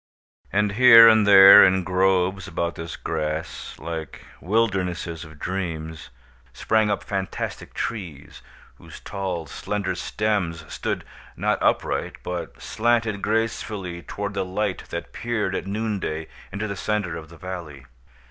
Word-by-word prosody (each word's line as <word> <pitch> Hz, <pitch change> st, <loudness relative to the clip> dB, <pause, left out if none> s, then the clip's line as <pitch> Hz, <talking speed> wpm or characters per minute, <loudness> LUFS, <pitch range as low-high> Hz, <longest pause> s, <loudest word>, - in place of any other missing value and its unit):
And, 105 Hz, 0 st, +1 dB
here 115 Hz, +1 st, +9 dB
and 110 Hz, -2 st, +5 dB
there, 100 Hz, 0 st, +10 dB
in 95 Hz, 0 st, +3 dB
groves 95 Hz, +1 st, +1 dB
about 85 Hz, -2 st, -2 dB
this 80 Hz, 0 st, -7 dB
grass, 80 Hz, 0 st, -4 dB
like 80 Hz, -1 st, -7 dB, 0.2 s
wildernesses 90 Hz, -5 st, -1 dB
of 80 Hz, -1 st, -13 dB
dreams, 80 Hz, -4 st, -5 dB, 0.4 s
sprang 110 Hz, +6 st, +1 dB
up 100 Hz, -, -1 dB
fantastic 95 Hz, -3 st, -5 dB
trees, 90 Hz, -11 st, -6 dB, 0.4 s
whose -, -, -13 dB
tall 95 Hz, -4 st, -4 dB
slender 100 Hz, +6 st, -3 dB
stems 95 Hz, -7 st, -2 dB
stood -, -, -3 dB, 0.3 s
not -, -, 0 dB
upright, -, -, 0 dB
but 90 Hz, -1 st, -5 dB
slanted 115 Hz, -3 st, 0 dB
gracefully 105 Hz, -5 st, -2 dB
toward 100 Hz, +4 st, -5 dB
the 100 Hz, -1 st, -1 dB
light 95 Hz, 0 st, -3 dB
that 85 Hz, -, -6 dB
peered 110 Hz, -5 st, -2 dB
at 95 Hz, -, -3 dB
noon 105 Hz, 0 st, -2 dB
day 80 Hz, -2 st, -4 dB, 0.2 s
into 100 Hz, +2 st, -3 dB
the 100 Hz, -, -4 dB
centre 100 Hz, -4 st, -2 dB
of 80 Hz, -1 st, -9 dB
the 85 Hz, -, -14 dB
valley. 85 Hz, -7 st, -8 dB
95 Hz, 135 wpm, -23 LUFS, 85-105 Hz, 0.4 s, there